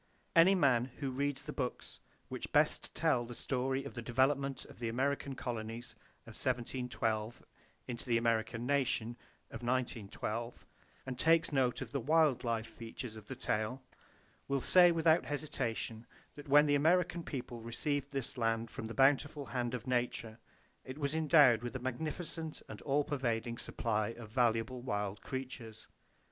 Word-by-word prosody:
Any 175 +4 +7
man 130 -8 +4
who 140 -3 -2
reads 140 +1 -1
the 150 0 -6
books 125 -3 -4 0.3
which - - -6
best - - +2
tell 120 - +2
the 120 0 -8
story 135 +2 -1
of 140 - -7
the 120 - -5
development 135 +3 +1
of - - -14
the 115 -1 -2
American 135 +3 -1
colonies 115 -1 -5 0.3
of - - -12
1712 120 -3 -2 0.4
into 120 -2 -4
the 120 -1 +3
American 115 0 0
nation 130 -4 +1 0.4
of 115 - -7
1912, 120 -2 -3 0.4
and 130 -1 -5
takes 165 +2 +4
due 145 - -4
note 125 -2 +2
of - - -6
the 140 - -1
wild 150 -1 +3
life 115 -2 -1
features 115 0 -8
of 105 -1 -11
the 130 - -5
tale, 125 +1 -2 0.6
will 140 0 +1
say 175 +5 +6
without 165 0 +3
hesitation 120 -6 -3 0.3
that 145 -1 -11
when 145 +2 +7
the 145 - +2
American 175 +4 +3
people 125 -6 -6
received 140 +5 -2
this 135 -2 -2
land 115 0 0
from - - -6
the 115 - -7
bountiful 140 +2 +3
hand 125 -2 -2
of 120 - -6
Nature, 120 -3 -1 0.4
it 130 +2 -8
was 140 -1 -1
endowed 150 -7 +6
with 120 +1 -5
a - - -2
magnificent 155 +5 -4
and - - -9
all 145 +1 +2
pervading 120 -4 -2
supply 110 -2 -1
of 115 -1 -8
valuable 120 +1 +1
wild 105 -4 -2
creatures. 130 -4 -6
125 Hz, 160 wpm, -34 LUFS, 115-140 Hz, 0.6 s, Any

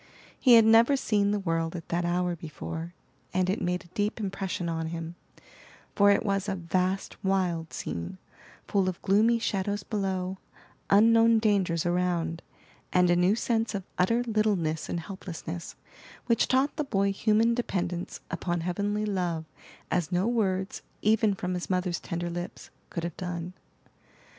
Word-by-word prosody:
He 250 -3 +7
had 225 -1 +7
never 230 +5 +6
seen 205 -5 +1
the 210 - +1
world 165 -3 -1
at 165 - -7
that 170 +1 0
hour 175 0 0
before, 165 +2 -7 0.4
and 185 0 +2
it 200 - -2
made 180 +1 -1
a 175 - -21
deep 210 +2 -1
impression 195 -2 -3
on 165 -1 -2
him; 165 0 -5 0.8
for 205 0 +6
it 200 - +3
was 195 0 0
a 195 - -1
vast, 185 +2 -2
wild 180 -4 0
scene, 85 - -5 0.5
full 195 -2 +2
of 180 - -6
gloomy 220 +4 +4
shadows 205 -2 -1
below, 190 -3 -2 0.5
unknown 225 +2 +6
dangers 195 -7 +1
around, 175 -2 0 0.5
and 180 -1 +4
a - - +5
new 180 +4 +3
sense 225 -2 0
of 195 - -3 0.2
utter 230 +7 +3
littleness 205 -9 0
and 170 - -2
helplessness, 175 -2 -7 0.5
which 230 -2 +2
taught 265 +2 +2
the 300 - +1
boy 200 -7 +1
human 220 +3 +3
dependence 180 -7 -3
upon 175 -1 -2
Heavenly 205 +4 -1
love 175 -5 -1 0.5
as 175 0 0
no 180 +2 +1
words, 195 -5 0 0.2
even 215 -1 +3
from 180 -1 -3
his 180 -1 -4
mother's 180 -2 0
tender 175 0 -4
lips, 175 +1 -6 0.2
could 170 - -4
have 170 -2 -4
done. 180 -1 -4
185 Hz, 155 wpm, -28 LUFS, 175-210 Hz, 0.8 s, He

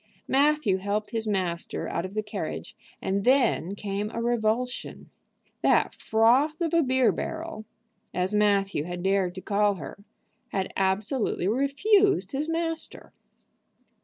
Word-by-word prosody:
Matthew 280 -7 +3
helped 205 +2 -2
his 225 -2 -2
master 185 -5 -2
out 170 - -2
of 190 +2 -8
the 215 - 0
carriage, 210 - -5 0.3
and 195 +1 0
then 240 -7 +2
came 205 +1 -3
a 230 - -5
revulsion. 240 +1 -1 0.5
That - - +3
"froth 250 +8 +2
of 340 -1 -1
a 335 - +5
beer 260 -3 +3
barrel," 325 -9 -5 0.5
as 185 +2 -1
Matthew 200 -6 +2
had 175 0 -5
dared 190 -2 +1
to 185 - -6
call 205 0 +2
her, 180 +4 -9 0.4
had 190 -1 -3
absolutely 195 +2 0
refused 370 - +2
his 295 +3 -2
master. 330 0 -3
215 Hz, 135 wpm, -26 LUFS, 195-275 Hz, 0.5 s, a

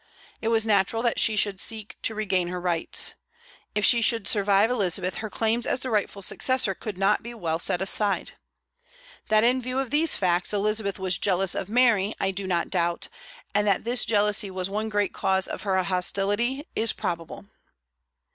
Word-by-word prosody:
It 225 - -3
was 225 -1 +3
natural 215 +2 +1
that 235 - +1
she 220 - +4
should 200 -2 0
seek 220 -2 -6
to 220 - -2
regain 190 -4 0
her 180 +1 -4
rights. 175 -2 0 0.6
If 210 - +2
she 235 - +5
should 225 -2 +2
survive 205 +1 +2
Elizabeth, 190 -5 0
her 220 - -5
claims 225 +2 0
as 250 - -1
the 260 - -4
rightful 205 -2 -1
successor 255 -1 +1
could 205 0 -7
not 195 +2 +2
be 235 +1 -8
well 165 -6 -2
set 175 +2 0
aside. 200 +1 +1 1.0
That 215 0 +3
in 250 +2 +3
view 255 +1 -4
of 265 -3 -2
these 310 +2 +3
facts 180 0 0
Elizabeth 205 -1 0
was 185 -2 -2
jealous 190 -1 +1
of 195 - -4
Mary 225 -4 +3
I 195 - 0
do 190 0 -5
not 175 -2 -1
doubt; 170 -2 -1 0.4
and 205 +1 +1
that 195 -2 +1
this 240 +2 +2
jealousy 210 -1 +2
was 185 0 -4
one 215 +2 -2
great 205 -2 0
cause 190 0 0
of - - -6
her 190 -2 0
hostility 205 - -1
is 225 0 0
probable. 170 -2 -5
205 Hz, 185 wpm, -25 LUFS, 190-225 Hz, 1.0 s, she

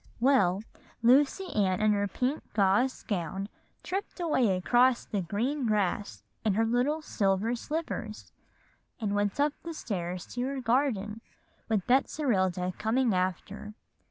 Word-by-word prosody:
Well, 225 -7 +3 0.4
Lucy 285 +10 +3
Ann 190 -3 +1
in 215 0 +3
her 205 0 +1
pink 255 +8 -1
gauze 210 +6 +2
gown 195 0 -3 0.3
tripped 390 +1 -4
away 260 - +2
across 245 +6 +3
the 205 - -2
grass 205 - -1 0.2
in 215 -3 +1
her 225 +2 +3
little 255 +7 +1
silver 200 -1 +1
slippers, 245 -5 -4 0.7
and 210 -3 -1
went 205 +3 0
up 290 0 +3
the 335 -1 -6
stairs 180 - -4
to 245 - -3
her 275 0 -3
garden 230 -4 0 0.5
with 210 -5 +1
Betserilda 195 - +1
coming 230 +1 +2
after. 185 +3 -3
220 Hz, 130 wpm, -29 LUFS, 195-260 Hz, 0.7 s, Well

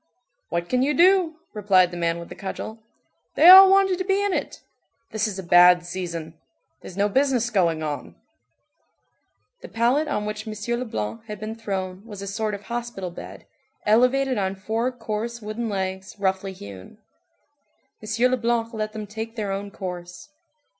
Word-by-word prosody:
"What 170 0 -2
can 250 +4 +1
you 285 +2 +1
do?" 355 0 +4 0.2
replied 190 -4 +3
the - - -7
man 170 -1 -1
with 170 - -9
the - - -7
cudgel, 220 +3 -7 0.6
"they 325 - +6
all 380 +1 +11
wanted 385 -1 +3
to - - 0
be 390 +1 +1
in 405 -1 0
it. - - -4 0.5
This 220 0 0
is 200 -2 -5
a 190 - -5
bad 175 0 +6
season. 170 -3 -5 0.5
There's 185 - -11
no 205 +1 +2
business 250 0 +1
going 170 -6 +1
on." 150 -2 -5 1.5
The - - -9
pallet 245 +7 +1
on 210 -8 -2
which 210 +1 -5
M. 215 +3 -3
Leblanc 220 - -5
had 210 -2 -7
been 215 +2 -5
thrown 195 -4 -5
was 205 -3 -9
a - - -5
sort 210 +1 -2
of 200 - -11
hospital 235 -6 -5
bed, - - -10 0.4
elevated 250 +3 +3
on 190 0 -1
four 225 +5 -2
coarse 235 -1 -5
wooden 220 +1 -4
legs, 190 -1 -4
roughly 190 -1 -1
hewn. 100 - -11 1.0
M. 225 +4 +1
Leblanc 235 -1 0
let 215 -1 -4
them 215 -1 -6
take 220 +2 -7
their 210 -3 -3
own 200 +1 -4
course. 175 - -8
215 Hz, 165 wpm, -24 LUFS, 190-240 Hz, 1.5 s, all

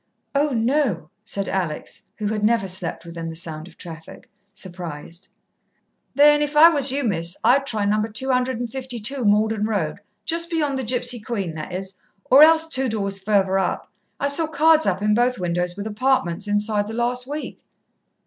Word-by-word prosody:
"Oh, 290 +2 +2
no," 230 - 0
said 200 -3 -4
Alex 180 -5 -3 0.2
who 210 - -4
had 210 -1 -2
never 220 -2 +2
slept 185 -2 -3
within 165 -1 -6
the 165 - -7
sound 160 -1 -6
of 175 - -17
traffic 165 -2 -11 0.2
surprised. 175 -2 -8 0.9
"Then 295 +1 +6
if 295 0 -1
I 325 +3 +10
was 285 -5 +2
you, 280 +1 -1
Miss, 170 -6 0
I'd 275 +2 +4
try 215 -5 -1
No. 210 +1 +2
252 250 +1 -2
Malden 215 0 +2
Road 200 -7 -2 0.3
just 335 0 0
beyond 295 -5 -1
the - - -3
Gipsy 245 0 +1
Queen, 205 -6 -4
that 155 +2 -7
is, 185 +1 -5 0.3
or 270 +3 +6
else 320 +1 +7
two 265 -4 0
doors 200 -3 -2
further 195 -1 +2
up. 185 - -2 0.3
I 280 - 0
saw 310 +3 0
cards 315 +1 +4
up 190 +1 0
in 210 0 +3
both 245 +3 +2
windows 175 0 -2
with 205 - -5
'apartments' 210 -5 0
inside 205 0 0
the 220 - -6
last 245 +1 -1
week." 295 +2 -6
215 Hz, 170 wpm, -22 LUFS, 190-265 Hz, 0.9 s, I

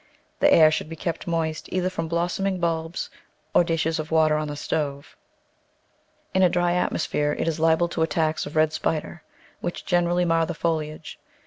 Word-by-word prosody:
The - - +5
air 155 -1 +7
should 155 - -2
be 165 - -6
kept 165 +1 -4
moist, 160 -2 -2
either 185 0 0
from 165 -3 -3
blossoming 175 +3 -1
bulbs 165 0 -2 0.4
or - - +6
dishes 165 -1 0
of 155 0 -4
water 160 -1 +3
oh 155 0 -1
the 145 - -5
stove. 145 -1 -3 1.2
In 190 - +3
a 185 - +6
dry 175 0 +1
atmosphere 150 -4 0
it - - -1
is 165 -1 -1
liable 165 +1 +3
to 165 - -3
attacks 160 -1 0
of 145 - -9
red 155 0 +3
spider, 160 +2 -2 0.4
which 175 - -5
greatly 175 0 +2
mar 165 -1 +2
the - - -4
foliage. 155 -2 -3
165 Hz, 180 wpm, -24 LUFS, 155-175 Hz, 1.2 s, air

